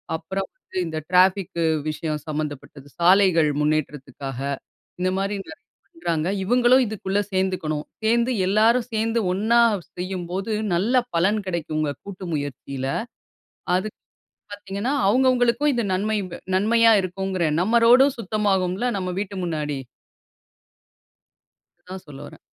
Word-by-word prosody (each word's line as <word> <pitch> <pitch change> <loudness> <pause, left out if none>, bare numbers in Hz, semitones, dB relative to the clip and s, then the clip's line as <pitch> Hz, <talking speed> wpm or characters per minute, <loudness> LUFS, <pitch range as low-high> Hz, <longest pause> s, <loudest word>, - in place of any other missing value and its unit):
அப்புறம் 190 +4 -4
வந்து - - -11
இந்த 160 -1 -4
ட்ராஃபிக்கு 185 -1 +3 0.3
விஷயம் 155 -1 -3
சம்மந்தப்பட்டது, 145 -2 -5
சாலைகள் 175 -3 +5
முன்னேற்றத்துக்காக, 140 -3 -2 0.6
இந்த 185 - +2
மாதிரி 195 +1 -1
நிறைய - - -13 0.2
பண்றாங்க. 170 - -2 0.2
இவுங்களும் 245 +4 +4
இதுக்குள்ள 200 -2 -2
சேந்துக்கணும். 185 -6 -1 0.2
சேந்து 235 +3 +2
எல்லாரும் 225 +4 +3
சேந்து 225 +1 0
ஒண்ணா 225 +5 +3 0.4
செய்யும்போது, 185 +3 -3 0.2
நல்ல 205 +8 0 0.2
பலன் 200 +6 +2
கிடைக்கும்ங்க 155 -4 -2
கூட்டு 190 -2 -8
முயற்சியில. 140 -1 -5 0.9
அதுக்கு 205 +3 -4 0.5
பார்த்தீங்கன்னா, 205 +4 -4 0.2
அவங்கவங்களுக்கும் 255 +3 +3
இது 235 - 0
நன்மையு 205 +1 0 0.3
நன்மையா 230 +3 +4
இருக்குங்கிறேன். 185 -4 -1
நம்ம 230 +5 +3
ரோடும் 260 +3 +6
சுத்தமாகும்ல, 200 -1 0
நம்ம 185 -1 -3
வீட்டு 200 -1 -4
முன்னாடி. 150 -3 -2 2.1
அதான் 185 +1 -9
சொல்ல 140 -2 -11
வரேன். - - -13
190 Hz, 110 wpm, -23 LUFS, 160-220 Hz, 2.1 s, ரோடும்